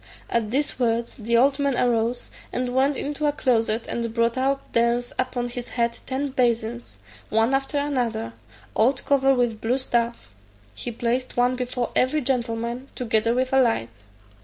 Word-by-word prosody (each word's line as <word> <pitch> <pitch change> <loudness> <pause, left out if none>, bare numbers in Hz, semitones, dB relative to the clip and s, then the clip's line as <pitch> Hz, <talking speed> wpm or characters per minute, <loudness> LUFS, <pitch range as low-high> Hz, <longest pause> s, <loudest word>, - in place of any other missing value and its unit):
At 230 -2 +1
these 280 +5 -1
words 235 -1 0
the 235 -1 +1
old 275 +3 +4
man 280 -3 +1
arose, 240 0 0 0.2
and 250 0 -2
went 270 +2 +2
into 295 +1 -2
a - - +3
closet, 230 -5 +1
and 235 -1 -2
brought 230 0 +1
out 275 +1 -1
thence 235 +1 +1
upon 250 -1 -1
his 245 0 -6
head 235 -1 -1
ten 275 +2 -2
basins, 235 - -1 0.3
one 225 +4 +2
after 270 +2 0
another, 245 - -1 0.4
all 245 +5 +4
covered 270 0 +2
with 240 -3 0
blue 240 +3 +1
stuff; 235 - -1 0.4
he - - -5
placed 240 +3 -2
one 245 +1 +3
before 250 -1 -2
every 280 +4 +3
gentleman, 240 -1 -2
together 230 -1 +1
with 255 +1 0
a 265 - +6
light. 225 - +1
245 Hz, 160 wpm, -24 LUFS, 230-265 Hz, 0.4 s, a